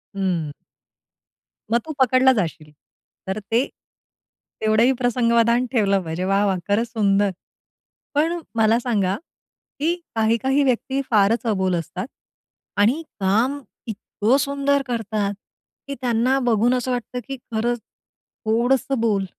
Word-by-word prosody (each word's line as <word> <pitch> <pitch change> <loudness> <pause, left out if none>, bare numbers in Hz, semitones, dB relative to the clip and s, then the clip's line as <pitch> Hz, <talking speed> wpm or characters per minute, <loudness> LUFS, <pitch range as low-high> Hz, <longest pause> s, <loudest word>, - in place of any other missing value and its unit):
हं. 175 -6 -1 1.2
मग 235 - +4
तू 315 - -5
पकडला 260 0 +5
जाशील. 160 -8 -3 0.6
तर 190 +2 -2
ते, 225 +5 0 1.0
तेवढंही 220 +3 +4
प्रसंगावधान 235 0 +3
ठेवलं 200 -6 +2
पाहिजे. 165 +2 -4
वाह, 195 +2 +2
वाह! 195 -2 +1
खरंच 210 +4 +1
सुंदर. 205 -3 +2 0.8
पण 330 +4 +1 0.2
मला 225 +1 +4
सांगा 205 -6 0 0.6
कि 325 +4 +1 0.2
काही-काही 230 +6 +2
व्यक्ती 265 +1 0
फारच 215 +2 +3
अबोल 190 -4 +1
असतात. 180 +4 -4 0.7
आणि 230 +10 +3 0.2
काम 225 +9 +1 0.3
इतकं 220 +3 0
सुंदर 280 0 +1
करतात 215 -4 -1 0.5
की 280 - -4
त्यांना 245 +2 +2
बघून 240 -1 +2
असं 255 0 -1
वाटतं 245 0 -3
की 275 - -4 0.2
खरंच 235 +2 0 0.7
थोडंस 240 +4 +2
बोल, 215 -4 +1
230 Hz, 120 wpm, -22 LUFS, 200-255 Hz, 1.2 s, पकडला